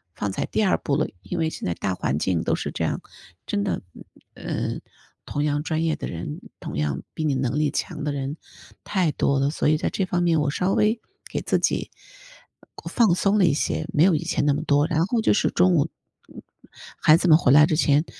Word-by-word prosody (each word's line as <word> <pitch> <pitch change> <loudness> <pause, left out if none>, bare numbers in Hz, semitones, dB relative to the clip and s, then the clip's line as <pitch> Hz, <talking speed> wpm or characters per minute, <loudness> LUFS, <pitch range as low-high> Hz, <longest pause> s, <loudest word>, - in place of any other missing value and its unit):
放 105 - -2
在 - - -2
第 220 - 0
2 195 - +3
步 140 - -1
了， 155 - +1
因 - - -5
为 160 - +1
现 - - -7
在 85 - 0
大 95 +2 -2
环 70 -5 -1
境 85 +1 0
都 - - +1
是 - - -4
这 - - -3
样， - - -1 0.5
真 205 -1 -1
的， 195 - -2 0.5
呃， - - -3 0.5
同 145 - -2
样 145 0 0
专 160 0 -1
业 160 -1 +1
的 - - -5
人， 80 -3 -6 0.2
同 - - -6
样 70 -2 -1
比 160 - -3
你 150 - +1
能 130 +1 -1
力 150 -2 +1
强 150 - -4
的 150 - -1
人 140 +2 -4 0.5
太 185 -6 0
多 140 -1 +1
了， 140 +1 +2
所 150 - -1
以 155 - +4
在 - - -1
这 195 - -1
方 180 -2 -1
面 165 -2 +3
我 145 -1 0
稍 185 +5 0
微 220 +2 +2 0.3
给 - - -2
自 - - +1
己 - - 0 1.0
放 220 -8 +4
松 200 +3 +2
了 190 - +5
一 160 - +3
些， 80 - -1
没 150 - +4
有 185 0 +5
以 150 - -2
前 - - -1
那 145 - +3
么 145 - -2
多， 145 -1 +3
然 160 0 +1
后 230 +4 0
就 - - +3
是 - - +2
中 180 +1 +3
午， 155 0 +2 1.1
孩 155 - +7
子 180 - 0
们 160 - +8
回 130 - +3
来 150 +2 +8
之 155 - 0
前 150 0 +3
150 Hz, 245 characters per minute, -24 LUFS, 140-175 Hz, 1.1 s, 们